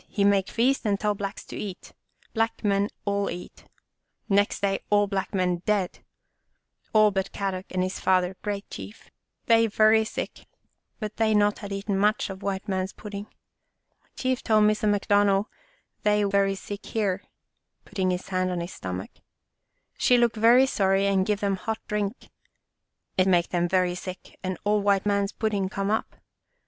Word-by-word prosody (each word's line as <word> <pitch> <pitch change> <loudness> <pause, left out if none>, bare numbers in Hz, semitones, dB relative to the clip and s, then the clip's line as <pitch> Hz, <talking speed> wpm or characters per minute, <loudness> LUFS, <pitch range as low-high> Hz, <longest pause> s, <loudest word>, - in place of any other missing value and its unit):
He 200 - -1
make 200 -1 +3
feast 255 +4 +1
and 200 -2 +1
tell 210 -1 +1
Blacks 200 0 -5
to - - -9
eat. 190 -3 -7 0.4
Black 225 0 -1
men 200 0 +2 0.2
all 200 0 0
eat. 175 +1 -8 0.6
Next 205 0 +2
day 195 -1 +1
all 205 0 +4
black 195 -1 -3
men 180 -3 +1
dead, 200 -4 0 0.9
all 215 -1 +5
but 195 0 -2
Kadok 190 -1 -3
and 185 0 -1
his 185 +1 -3
father, 185 0 +2
great 205 -1 -4
Chief. 210 - -10 0.3
They 230 -1 +5
very 220 +1 +4
sick, 220 - -6 0.5
but 215 -2 -5
they 220 -1 +3
not 205 0 +3
had 205 -2 -7
eat 195 +1 -5
much 205 0 +1
of 190 +1 -9
white 195 -1 -3
man's 190 -1 -2
pudding. 205 0 -7 0.9
Chief 255 -1 -1
tell 215 -1 +3
Missa 215 0 +3
McDonald 205 -1 +3 0.6
they 210 0 +3
very 200 -1 +2
sick 200 +1 -7
here/' 200 -4 -1 0.3
— - - -49
putting 185 -2 -1
his 180 +1 -3
hand 185 -1 0
on 180 -1 -2
his 170 +2 -5
stomach 95 0 -5 0.3
— - - -55
" - - -46
She 250 - +5
look 240 -1 +3
very 235 +4 +6
sorry 195 -5 +2
and 195 -1 +2
give 210 -1 0
them 200 -1 0
hot 220 +4 -3
drink. 210 +2 -3 0.9
It 185 - +4
make 175 -2 +3
them 175 -1 0
very 185 -1 +2
sick 185 +1 -8
and 185 0 -3
all 210 0 +2
white 200 -1 +2
man's 200 -1 +1
pudding 205 -4 -1
come 195 +1 -2
up. 220 - -1
200 Hz, 175 wpm, -26 LUFS, 190-210 Hz, 0.9 s, very